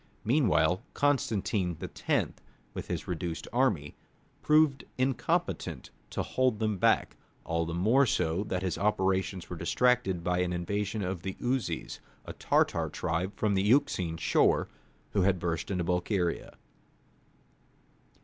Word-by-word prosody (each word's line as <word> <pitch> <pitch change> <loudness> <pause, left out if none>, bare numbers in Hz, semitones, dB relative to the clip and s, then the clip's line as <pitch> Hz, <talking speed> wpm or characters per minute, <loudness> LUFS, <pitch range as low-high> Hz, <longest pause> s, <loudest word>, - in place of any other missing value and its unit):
Meanwhile, 105 - +3
Constantine 105 - 0
X., - - -1 0.4
with - - -6
his - - -4
reduced 85 -1 -4
army, 120 - +1 0.5
proved 150 -4 +3
incompetent 130 0 -1 0.2
to - - -2
hold 130 -4 +1
them 110 -3 -1
back; - - +2 0.3
all 85 0 -1
the 85 - -3
more 115 +10 +4
so 90 -1 0
that 95 -2 -2
his 95 - -2
operations 95 -3 0
were 90 - -6
distracted 95 +1 +1
by 90 0 0
an 90 0 0
invasion 100 +4 -2
of 90 -1 -3
the 95 +1 -4
Uzes, 125 0 -2 0.3
a - - -7
Tartar - - +1
tribe 85 +5 -2
from 105 -2 +1
the 95 - +2
Euxine 105 - +2
shore, - - +2 0.4
who 100 - +1
had 95 0 +3
burst 85 -2 -2
into 90 -3 -1
Bulgaria. 90 +1 -1
95 Hz, 130 wpm, -29 LUFS, 90-115 Hz, 0.5 s, more